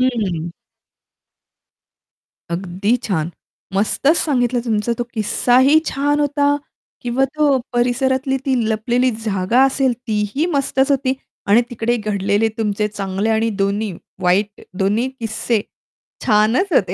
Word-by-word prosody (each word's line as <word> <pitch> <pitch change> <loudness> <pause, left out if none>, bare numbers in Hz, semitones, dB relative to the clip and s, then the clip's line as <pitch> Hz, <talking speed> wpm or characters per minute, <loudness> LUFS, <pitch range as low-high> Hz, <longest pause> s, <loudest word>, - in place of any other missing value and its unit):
हं. 200 -10 0 2.0
अगदी 190 +6 0
छान, 170 -6 -1 0.4
मस्तच 275 - +2
सांगितलं. 245 -4 +1
तुमचा 225 0 0
तो 240 - -1
किस्साही 255 +7 +4
छान 290 +2 0
होता 285 0 +2 0.5
किंवा 250 +2 +1
तो 290 -3 +3
परिसरातली 260 +2 +1
ती 265 - +2
लपलेली 240 +3 +1
जागा 200 +4 +2
असेल 270 -1 +2
तीही 215 +8 0
मस्तच 275 0 +1
होती 265 -1 +1 0.3
आणि 210 +4 +5
तिकडे 240 +1 0
घडलेले 205 0 0
तुमचे 210 -1 0
चांगले 200 +1 -2
आणि 225 +1 +1
दोन्ही 200 +1 -1 0.3
वाईट 195 +3 +1 0.2
दोन्ही 210 +6 +1
किस्से 225 0 -1 0.7
छानच 220 - +3
होते, - - +2
230 Hz, 115 wpm, -19 LUFS, 205-265 Hz, 2.0 s, आणि